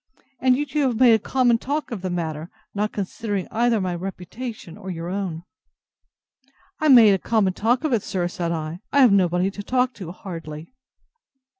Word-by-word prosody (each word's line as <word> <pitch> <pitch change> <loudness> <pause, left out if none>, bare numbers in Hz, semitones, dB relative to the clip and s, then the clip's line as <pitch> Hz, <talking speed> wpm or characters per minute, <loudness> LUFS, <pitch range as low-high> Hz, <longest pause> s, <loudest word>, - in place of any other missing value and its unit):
and 255 -1 +3
yet 290 -1 -4
you 300 - +2
have 250 -5 0
made 250 -3 +7
a 220 - +4
common 245 0 +2
talk 290 +3 -3
of 220 -5 -4
the 185 - -3
matter, 165 -2 -4 0.2
not 210 +1 -1
considering 205 0 -3
either 235 0 +2
my 185 -2 -2
reputation, 185 +2 -7
or 190 -2 -9
your 170 -1 -5
own.—I 195 - -8
made 235 -7 +8
a 190 - +1
common 200 -2 +1
talk 240 - +1
of 305 -5 0
it, 225 - +2
sir! 180 -2 -2
said 175 -1 -3
I: 160 +1 -4
I 285 - +4
have 250 -5 +7
nobody 185 -1 +2
to 205 - -7
talk 250 +3 0
to, 185 -7 -8
hardly. 165 -1 -8
200 Hz, 180 wpm, -23 LUFS, 180-245 Hz, 0.2 s, made